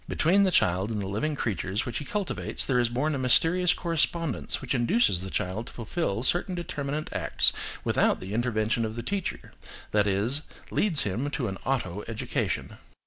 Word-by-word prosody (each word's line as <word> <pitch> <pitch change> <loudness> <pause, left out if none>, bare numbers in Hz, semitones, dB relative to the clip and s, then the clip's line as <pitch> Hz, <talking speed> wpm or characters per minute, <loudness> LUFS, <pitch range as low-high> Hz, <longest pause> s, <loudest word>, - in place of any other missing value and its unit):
Between 185 +6 +3
the 195 - +4
child 95 - +2
and 110 -2 -2
the 100 - -3
living 130 +11 -1
creatures 105 -4 -1
which 120 - -3
he 150 - -6
cultivates 205 +4 -2
there 125 -2 +2
is 120 -1 +2
born 140 +6 0
a 140 - -1
mysterious 165 +8 +4
correspondence 165 -3 0
which 130 -1 -2
induces 125 - +3
the 95 - -4
child 95 +6 -2
to - - -9
fulfil 115 - -2
certain 180 +6 +1
determinate 150 -3 -3
acts - - +3 0.3
without - - +2
the 95 +2 -6
intervention 115 -1 +1
of 110 0 -3
the 120 - -4
teacher, 195 +7 -3 0.4
that 105 -1 +3
is, 105 +9 +1 0.3
leads 180 -8 +2
him 115 +9 -1
to 140 -5 -2
an 95 -2 -5
auto 105 -7 -1
education. 115 -1 -2
125 Hz, 180 wpm, -27 LUFS, 105-155 Hz, 0.4 s, the